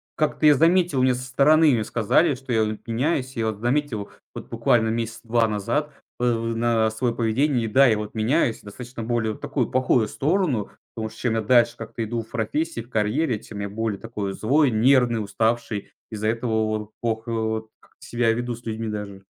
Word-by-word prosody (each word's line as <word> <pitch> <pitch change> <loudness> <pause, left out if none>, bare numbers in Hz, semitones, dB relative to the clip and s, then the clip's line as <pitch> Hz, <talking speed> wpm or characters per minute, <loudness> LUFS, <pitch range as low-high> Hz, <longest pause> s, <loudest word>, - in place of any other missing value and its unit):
как-то 155 0 0
я 150 - +7
заметил- 165 -2 +3
мне 130 - +4
со 125 - -6
стороны, 150 +4 +4
мне 115 -4 +1
сказали,- 120 +8 +2
что 130 -1 -5
я 110 - +3
от 110 +1 -5
меняюсь. 130 +2 -1
Я 115 -1 -1
вот 110 -2 -3
заметил 120 -4 -1 0.2
вот - - -9
буквально 110 -2 +2
месяца 115 0 -3
2 115 0 +2
назад 110 +9 -1 0.3
вот 125 - +1
это 115 -2 +1
вот 115 0 -2
на 115 -1 +2
своё 115 +2 -1
поведение. 120 +2 +1
И - - -2
да, 135 +5 +5
я 110 - +3
вот 105 0 -6
меняюсь 115 +2 +1
достаточно 120 +3 -8
более 115 -2 -1
в - - -11
такую 125 -6 -2
плохую 125 -3 +2
сторону, 145 - 0 0.2
потому 110 -1 -4
что 110 - -15
чем 120 -3 0
я 110 - +1
дальше 120 +1 +4
как-то 115 0 -5
иду 115 +1 -3
в 110 - -14
профессии, 120 +5 -2
в 120 - -15
карьере, 110 +3 0
тем 105 -1 -10
я 100 - -3
более 110 -1 -3
такой 105 -4 -4
злой, 135 +7 +2
нервный, 120 -1 +3
уставший. 110 0 -1 0.2
Из-за 110 0 -3
этого 115 +1 -1 0.2
вот 110 0 -3
плохо 115 0 -2
вот 110 -1 -2
как-то - - -19
себя 120 -1 +1
веду 120 +1 -3
с 120 +1 -16
людьми 110 0 -3
даже. 100 -2 -6
115 Hz, 205 wpm, -23 LUFS, 110-130 Hz, 0.3 s, я